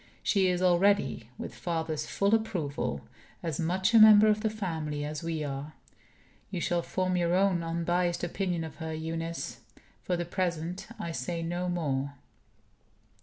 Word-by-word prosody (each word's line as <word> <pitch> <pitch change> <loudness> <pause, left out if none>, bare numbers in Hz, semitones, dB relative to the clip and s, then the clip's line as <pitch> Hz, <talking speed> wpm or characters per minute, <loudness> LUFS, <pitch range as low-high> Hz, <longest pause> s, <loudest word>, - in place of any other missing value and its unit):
She 195 -3 +3
is 180 0 +1
already 180 - +3
(with - - -6
father's 160 -3 -2
full 200 +2 +1
approval) 175 - -1 0.4
as 160 -4 -2
much 185 +6 +1
a 230 - +8
member 215 -1 +9
of 215 0 +3
the 220 - +1
family 160 -8 -3
as 150 0 -4
we 165 -2 -2
are. 140 +1 -5 0.8
You 190 -4 -3
shall 175 0 +1
form 185 +1 -1
your 175 0 +2
own 190 -2 +3
unbiased 170 +1 0
opinion 175 -1 -1
of 160 - -8
her, 160 -1 -4
Eunice. 165 +1 -4 0.4
For 180 - -1
the 175 - -2
present, 175 0 -2
I 170 - -4
say 165 +4 -3
no 175 +2 -2
more." 140 -5 -1
170 Hz, 155 wpm, -29 LUFS, 160-185 Hz, 0.8 s, member